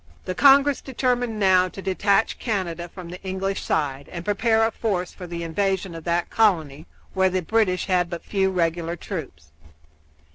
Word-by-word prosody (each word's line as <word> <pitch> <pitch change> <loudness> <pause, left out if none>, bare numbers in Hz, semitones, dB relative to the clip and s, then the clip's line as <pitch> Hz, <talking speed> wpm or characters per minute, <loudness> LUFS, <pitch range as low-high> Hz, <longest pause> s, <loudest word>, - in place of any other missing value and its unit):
The 185 - -2
Congress 280 +4 +5
determined 245 -3 -1
now 185 -2 +4
to 195 - -11
detach 200 +2 +1
Canada 175 -6 -3
from 180 -1 -10
the 180 +2 -9
English 190 +1 -3
side 140 -2 -2
and 170 -1 -7
prepared 220 +2 +2
a 225 +1 +2
force 190 -6 -2
for 180 - -9
the 170 0 -5
invasion 190 +2 -1
of 165 -1 -9
that 170 0 0
colony, 160 -9 +1 0.3
where 190 -1 +3
the 185 0 -1
British 200 -2 +1
had 180 -2 +1
but 170 -1 -6
few 195 -2 +1
regular 170 -2 -1
troops. 135 - -7
185 Hz, 170 wpm, -23 LUFS, 170-205 Hz, 0.3 s, Congress